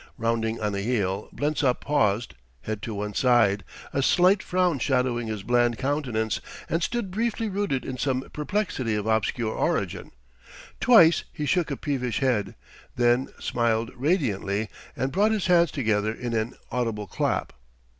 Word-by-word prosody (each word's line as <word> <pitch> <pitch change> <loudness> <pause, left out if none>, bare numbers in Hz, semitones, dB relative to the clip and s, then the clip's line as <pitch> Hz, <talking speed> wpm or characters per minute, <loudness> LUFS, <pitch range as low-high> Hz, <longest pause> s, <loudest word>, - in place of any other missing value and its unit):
Rounding 115 -1 -1
on 105 -1 -1
a 100 - -2
heel, 100 -3 -1
Blensop 145 -3 0
paused, 120 -6 +1 0.3
head 110 -1 -4
to 110 -1 -5
one 105 +1 -4
side, 115 -4 +3 0.3
a 135 - +1
slight 185 +7 +4
frown 180 -5 +1
shadowing 125 -2 0
his 105 -3 -4
bland 120 0 +2
countenance, 125 -7 -1 0.3
and 165 - 0
stood 230 -1 -2
briefly 225 +2 -1
rooted 190 -10 -1
in 130 -1 -5
some 130 -1 -1
perplexity 150 - -1
of 105 -1 -2
obscure 110 +1 0
origin. - - -1 0.7
Twice 175 -9 +6
he 150 - -4
shook 175 +1 +1
a 140 - -3
peevish 130 -5 -2
head, 110 -8 0 0.4
then 120 +2 +3
smiled 115 -1 0
radiantly 110 - 0 0.3
and 130 +1 -1
brought 205 +6 +3
his 210 -4 -1
hands 175 -2 +4
together 110 -6 0
in 120 +1 -5
an 115 +2 -1 0.2
audible 115 -4 -1
clap. - - -1
125 Hz, 150 wpm, -26 LUFS, 110-150 Hz, 0.7 s, Twice